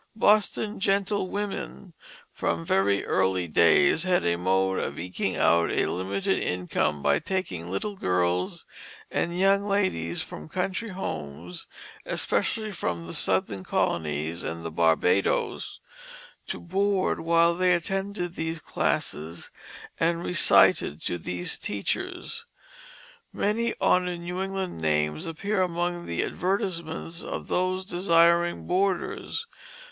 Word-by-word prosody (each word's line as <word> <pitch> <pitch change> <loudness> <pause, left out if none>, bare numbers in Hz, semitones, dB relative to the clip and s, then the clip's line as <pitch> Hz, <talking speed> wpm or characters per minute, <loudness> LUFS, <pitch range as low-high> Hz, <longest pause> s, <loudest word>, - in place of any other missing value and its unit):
Boston 215 0 +2
gentlewomen 200 -1 -1 0.4
from 85 0 -1
very 100 +1 +2
early 95 -2 +1
days 85 - +5
had 180 0 +2
a 85 0 +2
mode 95 +2 +1
of - - -3
eking 90 +2 -2
out 85 0 +4
a - - +1
limited 95 +1 -1
income 90 -5 -1
by 70 0 +3
taking 90 - -3
little 200 - -3
girls 90 - 0 0.5
and 170 +1 -1
young 195 +1 +4
ladies 135 - 0
from 75 +1 -9
country 220 +4 -2
homes, 85 - -6 0.4
especially 215 -1 0
from 85 - -3
the 85 - -7
southern 95 +1 +1
colonies 80 0 -1
and 85 0 -5
the 80 - -3
Barbadoes, 85 +4 +1 0.7
to - - -4
board 195 +2 0
while 170 +1 +4
they 180 +1 +2
attended 190 0 -2
these 160 -1 -3
classes 80 - -2 0.5
and 170 +1 +1
recited 155 - +4
to 90 - -2
these 90 +2 -2
teachers. 100 -1 -3 0.8
Many 230 +3 0
honored 180 -1 +2
New 180 +2 -4
England 190 - -3
names 75 -1 0
appear 195 +5 -1
among 175 -1 -1
the 85 - -1
advertisements 170 -3 -2
of - - -5
those 185 +1 0
desiring 170 -2 +3
boarders. 190 - -1
165 Hz, 115 wpm, -26 LUFS, -, 0.8 s, days